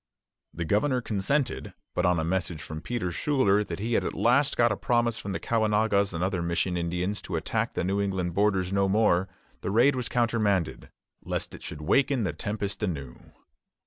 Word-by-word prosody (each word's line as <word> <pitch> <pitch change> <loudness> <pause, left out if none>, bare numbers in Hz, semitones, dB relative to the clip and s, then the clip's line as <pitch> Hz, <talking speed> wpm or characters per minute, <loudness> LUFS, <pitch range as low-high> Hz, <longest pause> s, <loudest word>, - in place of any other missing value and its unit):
The 85 +2 -4
governor 125 - +2
consented; 120 +5 -1 0.2
but 90 0 +1
on 90 -2 +3
a - - 0
message 85 -2 -2
from 80 0 -6
Peter 110 -6 -2
Schuyler 105 - +2
that 85 -5 -5
he 115 +5 -2
had - - +2
at - - -3
last 130 +4 +3
got 120 -1 +4
a - - +1
promise 120 +1 +1
from 100 - -5
the - - -2
Caughnawagas 105 -3 +2
and 85 0 -3
other 95 -1 0
mission 85 +2 0
Indians 90 +4 -2
to 90 - -5
attack 80 - -1
the - - 0
New 95 +3 0
England 95 -3 -1
borders 95 -1 +1
no 100 0 +2
more, 95 -3 +3 0.3
the - - -3
raid 120 +7 +4
was 125 -1 -3
countermanded, 110 -7 0 0.3
lest - - -3
it - - -10
should 75 - -7
waken 135 - +2
the 90 -6 -1
tempest 105 -1 -4
anew. 70 -11 -3
100 Hz, 190 wpm, -27 LUFS, 90-115 Hz, 0.3 s, got